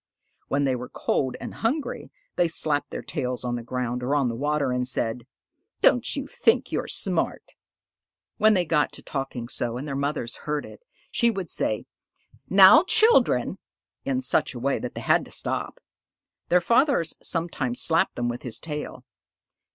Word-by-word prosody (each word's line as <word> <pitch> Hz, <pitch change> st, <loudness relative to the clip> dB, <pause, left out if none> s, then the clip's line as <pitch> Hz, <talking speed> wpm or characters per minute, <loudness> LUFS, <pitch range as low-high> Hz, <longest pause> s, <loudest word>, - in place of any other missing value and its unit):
When 140 Hz, +1 st, 0 dB
they 135 Hz, -2 st, +1 dB
were 125 Hz, 0 st, -6 dB
cold 130 Hz, -2 st, -1 dB
and -, -, -7 dB
hungry, 275 Hz, +7 st, -3 dB, 0.2 s
they 175 Hz, -, +3 dB
slapped 150 Hz, -3 st, 0 dB
their -, -, -6 dB
tails 125 Hz, -1 st, -3 dB
on 120 Hz, 0 st, -1 dB
the 120 Hz, -, -4 dB
ground 125 Hz, +1 st, -3 dB
or 130 Hz, +4 st, 0 dB
on 135 Hz, -4 st, +2 dB
the 115 Hz, -, -4 dB
water 145 Hz, +1 st, 0 dB
and 125 Hz, 0 st, -1 dB
said, 120 Hz, -1 st, -2 dB, 0.6 s
"Don't -, -, +3 dB
you -, -, -3 dB
think -, -, +1 dB
you're -, -, -2 dB
smart!" -, -, 0 dB, 0.9 s
When 215 Hz, 0 st, +5 dB
they 180 Hz, -2 st, +1 dB
got 150 Hz, -2 st, +1 dB
to -, -, -8 dB
talking 135 Hz, -4 st, -4 dB
so 120 Hz, -1 st, -2 dB
and 140 Hz, +4 st, -6 dB
their 140 Hz, -, -3 dB
mother 140 Hz, -1 st, -1 dB, 0.2 s
heard 150 Hz, -1 st, -3 dB
it, -, -, -13 dB, 0.3 s
she 235 Hz, -, +3 dB
would 195 Hz, -7 st, -3 dB
say, 110 Hz, -, 0 dB, 0.6 s
"Now, 195 Hz, -, +8 dB
children!" 445 Hz, +3 st, +3 dB, 0.4 s
in 265 Hz, -1 st, -1 dB
such 245 Hz, -, +1 dB
a -, -, -5 dB
way 135 Hz, +3 st, 0 dB
that 125 Hz, -, -6 dB
they -, -, -5 dB
had -, -, +3 dB
to -, -, -15 dB
stop. -, -, -3 dB, 0.7 s
Their 180 Hz, 0 st, +4 dB
father 255 Hz, -, +3 dB, 0.2 s
sometimes 155 Hz, -8 st, -2 dB
slapped 165 Hz, 0 st, +2 dB
them 120 Hz, 0 st, -1 dB
with 120 Hz, +1 st, -4 dB
his 120 Hz, -3 st, -3 dB
tail. 150 Hz, -5 st, -6 dB
140 Hz, 175 wpm, -25 LUFS, 125-175 Hz, 0.9 s, Now